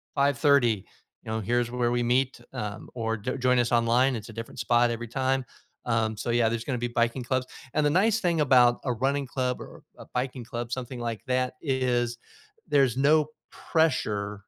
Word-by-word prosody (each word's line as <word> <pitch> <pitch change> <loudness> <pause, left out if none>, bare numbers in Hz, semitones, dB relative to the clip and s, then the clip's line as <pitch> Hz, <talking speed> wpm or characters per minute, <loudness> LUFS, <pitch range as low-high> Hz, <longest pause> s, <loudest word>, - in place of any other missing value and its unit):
5:30, 140 -6 +3 0.4
you 110 - -6
know, 110 - -1
here's 120 +3 0
where 125 -1 0
we 120 0 +1
meet, 125 +2 +1
um, 105 0 -5
or 115 -2 -2
jo 125 +6 -3
join 125 -1 +2
us 120 0 +1
online, 120 +2 +3
it's 110 +1 -7
a - - -9
different 115 0 -8
spot 120 0 +3
every 115 0 -4
time," 130 +2 0 0.4
um, 115 -2 0
so, 115 - -4
yeah, 120 -1 +3
there's 115 0 -2
gonna 130 -3 -1
be 120 +1 -2
biking 120 +1 0
clubs, 130 +1 -1 0.3
and 150 - +2
the - - +4
nice 210 +7 +3
thing 170 -4 +1
about 125 -3 +5
a 125 - +1
running 135 +4 0
club 125 -1 -2
or - - -11 0.2
a - - -11
biking 125 0 -2
club, 120 -1 -5
something 125 0 -4
like 115 -2 -4
that, 130 0 0
is 125 -4 0 0.5
there's 135 -5 +3
no 150 +2 +4 0.3
pressure 105 -11 0
120 Hz, 190 wpm, -27 LUFS, 115-130 Hz, 0.5 s, about